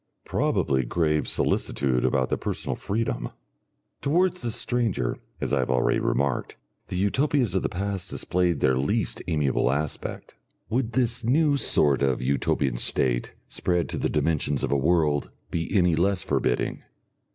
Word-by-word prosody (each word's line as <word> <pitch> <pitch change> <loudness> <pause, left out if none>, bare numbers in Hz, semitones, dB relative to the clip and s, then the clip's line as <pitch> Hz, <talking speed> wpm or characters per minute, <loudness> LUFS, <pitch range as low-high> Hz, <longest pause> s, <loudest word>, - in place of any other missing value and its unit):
Probably 65 -1 +1
grave 75 +3 0
solicitude 65 -3 0
about 65 -2 +1
their - - 0
personal - - -3
freedom. 105 - -2 0.7
Towards 180 +5 +1
the 120 - -2
Stranger, 115 - 0 0.2
as - - -2
I 70 - +3
have 65 - -1
already 65 -1 +2
remarked, 70 0 -1 0.3
the 90 - -4
Utopias 125 - +1
of 95 - +1
the - - -1
past 95 0 -3
displayed 90 -4 0
their 65 -1 +3
least 105 - 0
amiable 75 -6 +1
aspect. 75 +2 -3 0.4
Would 120 -1 0
this 120 -1 0
new 145 +5 +3
sort 75 - +3
of 65 -2 +1
Utopian 65 -1 0
State, - - 0
spread 90 -1 -1
to - - -3
the - - 0
dimensions 75 -3 0
of - - -1
a - - +3
world, 75 0 +2 0.2
be 80 -1 -2
any 90 -5 +3
less 95 +2 +1
forbidding? - - -1
85 Hz, 150 wpm, -25 LUFS, 70-110 Hz, 0.7 s, I